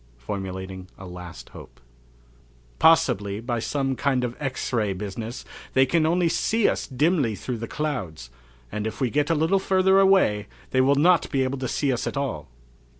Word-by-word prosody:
Formulating 95 +5 -6
a 95 - -10
"Last 90 -1 -9
Hope." - - -13 1.0
"Possibly, 105 -12 +3
by 120 +1 -2
some 135 +2 -1
kind 130 -1 0
of 120 -1 -3
X 135 -2 -3
ray 105 -4 +1
business, 105 +5 -6 0.3
they 130 0 +6
can 155 +3 +2
only 175 +1 +2
see 220 +6 +1
us - - -1
dimly 145 - +1
through 120 +5 -5
the 115 - -5
clouds, 95 - -4 0.4
and 105 +1 -3
if 110 - -6
we 130 -4 0
get 145 +1 +1
a 165 - +3
little 165 +6 +2
further 190 0 +3
away 190 - +3 0.2
they 130 - +3
will 140 +2 +4
not 170 +4 +4
be 135 -2 +1
able 130 +1 -2
to 130 - -2
see 135 +2 0
us 120 - -3
at - - -3
all." 115 - -3
130 Hz, 180 wpm, -24 LUFS, 105-155 Hz, 1.0 s, they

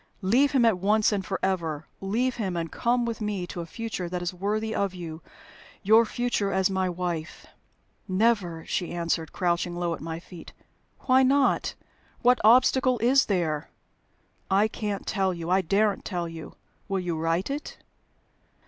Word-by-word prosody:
Leave 250 +9 +3
him 255 -4 +4
at 220 -5 +3
once 210 +3 +3
and 200 -2 -1
forever. 170 -6 -2
Leave 235 +6 -1
him, 190 -6 -2
and 165 -1 -3
come 240 0 +1
with 230 -1 -4
me 205 -4 -2
to 175 - -6
a 165 - -7
future 215 -3 -5
that 180 0 -3
is 175 +1 -2
worthy 215 +4 -2
of 200 -3 -1
you 165 -2 -7 0.6
your 220 +3 +6
future 230 -3 -1
as 190 0 +2
my 190 -1 0
wife." 175 -2 -4 0.6
"Never!" 185 -5 +1
she 175 - -2
answered, 170 -2 -2
crouching 175 -1 -1
low 175 -1 -1
at - - -7
my 165 0 -5
feet. 175 -1 -12 0.5
"Why 260 0 +4
not? 270 +1 +2 0.5
What 250 +1 +5
obstacle 255 +2 +5
is 250 +4 +3
there?" 165 -6 -1 0.8
"I 200 +3 +4
can't 210 -2 -4
tell 190 -2 0
you 170 +1 -4
I 190 +1 +4
daren't 200 +3 +1
tell 175 -3 -3
you." 165 -1 -9 0.3
"Will 195 -1 -1
you 175 -2 -2
write 165 +8 -1
it?" 290 +2 -5
190 Hz, 165 wpm, -26 LUFS, 175-220 Hz, 0.8 s, your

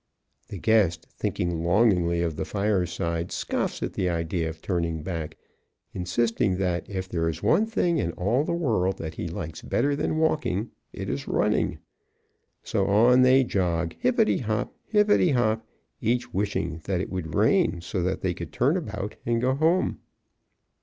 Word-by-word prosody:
The 100 - -7
guest, 95 -6 +2
thinking 85 -2 -2
longingly 85 -3 +3
of 80 -2 -2
the - - -2
fireside, 90 -4 -1
scoffs - - -2
at - - -3
the 90 - 0
idea 85 0 -1
of 80 0 -9
turning 85 -3 -2
back, 80 -3 -5 0.6
insisting 95 +1 0
that 90 -3 -1
if 95 -2 -4
there 80 -3 -1
is 80 - -6
one 210 - +3
thing 175 -7 +1
in 85 - 0
all 115 +10 +1
the - - -2
world 110 - 0
that 80 0 -5
he 85 - -4
likes 80 -1 -6
better 145 0 0
than 150 +1 -1
walking 150 - 0 0.2
it - - -6
is - - -3
running. - - +1 0.9
So - - 0
on 120 +5 +5
they 130 +1 +6
jog, 85 -6 -1
hippity 110 -5 +2
hop, 110 -3 -2
hippity 210 -4 +4
hop, 115 -5 +1 0.3
each 120 +2 0
wishing 85 -5 -2
that 95 -2 0
it 90 - -4
would 85 -4 -4
rain - - +3
so 90 +2 -3
that 90 +1 -1
they 90 -2 0
could 85 -2 -7
turn 140 +8 +2
about 105 - -5
and 115 0 +1
go 130 +2 +2
home. 160 +6 +1
95 Hz, 165 wpm, -26 LUFS, 85-120 Hz, 0.9 s, they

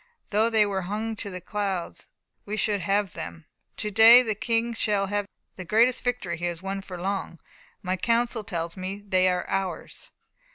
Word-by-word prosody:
"Though 220 +2 +3
they 220 -2 +4
were 195 -2 -1
hung 220 +2 -2
to 205 - -5
the 185 -1 -6
clouds, 195 -2 -4 0.4
we 210 +1 -4
should 205 -1 0
have 200 -2 0
them. 80 0 -7 0.3
To 210 - -3
day 225 +4 +9
the 220 -3 -1
King 235 +1 -1
shall 210 -3 +1
have 205 0 -2 0.3
the 185 - -6
greatest 230 +7 +3
victory 230 -9 -2
he 175 - -4
has 175 0 -4
won 195 0 -3
for 185 -2 -8
long. 190 -2 -3 0.4
My 185 0 -1
counsel 235 +2 0
tells 170 -5 -4
me 190 +2 -5
they 185 -1 +3
are 180 -1 0
ours." 195 -2 -4
200 Hz, 180 wpm, -26 LUFS, 185-220 Hz, 0.4 s, day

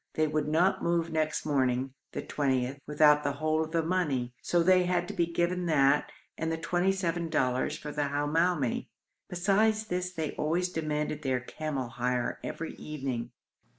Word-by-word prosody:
They 155 - +3
would 155 -1 -1
not 170 +5 +2
move 170 -1 0
next 155 -1 -1
morning 130 -3 +1 0.2
(the - - -3
20th) 135 -1 -1
without 150 0 +5
the 145 0 0
whole 155 +2 0
of 160 - -7
the 165 -1 +1
money, 150 -9 0
so 175 -1 +2
they 185 0 +5
had 175 -1 0
to - - -4
be 170 - +1
given 175 +1 0
that 145 -2 +3 0.3
and 160 0 -1
the 160 - -1
twenty 175 +3 +1
seven 175 -3 -1
dollars 130 -3 0
for 150 - -7
the 145 0 -1
Hamoumi. 145 -1 +1 0.4
Besides 210 +4 +2
this 180 -2 -2
they 160 -4 -3
always 175 +4 0
demanded 150 -3 -2
their 130 -3 0
camel 135 0 -4
hire 125 0 -1
every 165 - -5
evening. 135 -6 -4
155 Hz, 170 wpm, -29 LUFS, 140-175 Hz, 0.4 s, without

